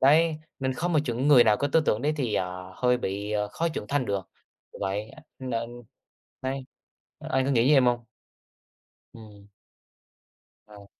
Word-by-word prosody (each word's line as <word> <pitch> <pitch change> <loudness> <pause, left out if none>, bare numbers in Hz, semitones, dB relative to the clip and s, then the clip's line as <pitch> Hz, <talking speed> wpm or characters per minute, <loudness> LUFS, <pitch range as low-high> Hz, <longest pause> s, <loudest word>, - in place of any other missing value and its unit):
Đấy, 155 +3 +4 0.2
nên 130 -1 -1
không 175 +6 -1
một 155 - +4
chuẩn 125 +2 -1
người 130 -5 +8
nào 105 -2 +4
có 145 - -1
tư 160 +3 +4
tưởng 105 - +1
đấy 150 +2 +2
thì, 125 -7 -1
ờ, 90 0 -3
hơi 125 0 +3
bị, 100 0 -3
ờ, 105 -1 0
khó 170 +10 -1
trưởng 155 -9 -5
thành 145 -2 +1
được, 95 -3 -2 0.4
kiểu - - -11
vậy, 100 +2 -2 0.3
nên 120 -1 -4 0.6
đấy, 135 0 -3 0.6
anh 130 0 0
có 135 - 0
nghĩ 120 0 +3
như 150 - +6
em 135 -3 +5
hông? 120 -1 +1 1.1
Ừm. 105 -3 -14 1.2
À. 105 -1 -14
120 Hz, 175 wpm, -27 LUFS, 105-135 Hz, 1.2 s, người